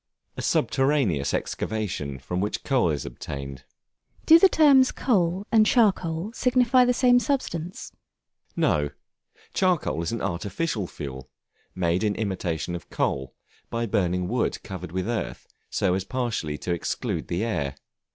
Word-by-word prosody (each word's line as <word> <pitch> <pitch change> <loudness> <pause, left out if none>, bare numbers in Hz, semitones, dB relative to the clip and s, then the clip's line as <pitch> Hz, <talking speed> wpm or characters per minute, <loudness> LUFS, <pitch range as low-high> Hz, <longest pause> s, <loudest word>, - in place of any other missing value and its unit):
A - - -5
subterraneous 135 - +1
excavation, 95 -11 -3
from 90 +8 -3
which 105 - -2
coal 130 - +2
is 75 -4 -2
obtained. 70 +1 -7 0.6
Do 325 +1 +8
the 385 - +7
terms 280 -6 +5
Coal 190 -5 +1
and 220 -1 +6
Charcoal 200 -4 +2
signify 250 0 +4
the 250 - +3
same 245 -1 +5
substance? 185 - -3 0.6
No; 75 -1 +2 0.6
Charcoal 180 - +1
is 85 - -2
an 115 - -2
artificial 100 - -2
fuel, 65 -4 -8 0.5
made 90 +1 +1
in 105 -1 +1
imitation 90 -6 -2
of 85 -3 -7
coal, 65 -1 -2 0.3
by 115 0 -1
burning 90 -4 0
wood 120 +3 -1
covered 90 -3 -7
with 95 +2 -2
earth 115 -2 -3 0.2
so 95 -2 +1
as 95 0 -1
partially 110 - -2
to 90 - -2
exclude 85 - -3
the 90 +5 -1
air. 70 - -2
105 Hz, 140 wpm, -25 LUFS, -, 0.6 s, Do